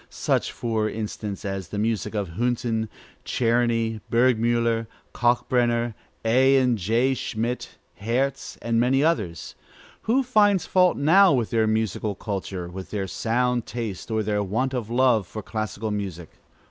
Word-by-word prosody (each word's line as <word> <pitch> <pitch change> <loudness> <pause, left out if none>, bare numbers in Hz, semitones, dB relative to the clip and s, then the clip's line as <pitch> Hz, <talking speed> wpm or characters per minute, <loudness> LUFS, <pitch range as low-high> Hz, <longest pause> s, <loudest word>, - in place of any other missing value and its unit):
such, - - -1
for 110 -2 -1
instance, 105 -2 -5
as 95 -2 -4
the 105 - -6
music 110 0 -1
of 100 -4 -2
Hünten, 115 +2 -1 0.3
Czerny, 115 -2 +1
Burgmüller, 115 -1 +2 0.3
Kalkbrenner, 120 -1 +1 0.3
A. 130 +4 +5
and 125 -2 +3
J. 115 +7 +1
Schmitt, 120 0 -3 0.2
Herz, 130 +6 -1
and 115 0 +1
many 130 +3 +3
others. 105 - -1 0.6
Who 265 +4 +4
finds 205 -7 +3
fault 180 -1 +3
now 180 +5 +6
with 120 -5 0
their 110 -2 +2
musical 110 -1 -1
culture, 95 -4 -4
with 95 +2 -8
their 100 -2 -2
sound 120 +4 0
taste, 115 -5 -5
or 110 -1 0
their 105 0 0
want 115 +7 -1
of 120 -4 -3
love 120 -5 +3
for 110 +3 -7
classical 110 0 -4
music? 95 -5 -5
115 Hz, 140 wpm, -24 LUFS, 105-125 Hz, 0.6 s, now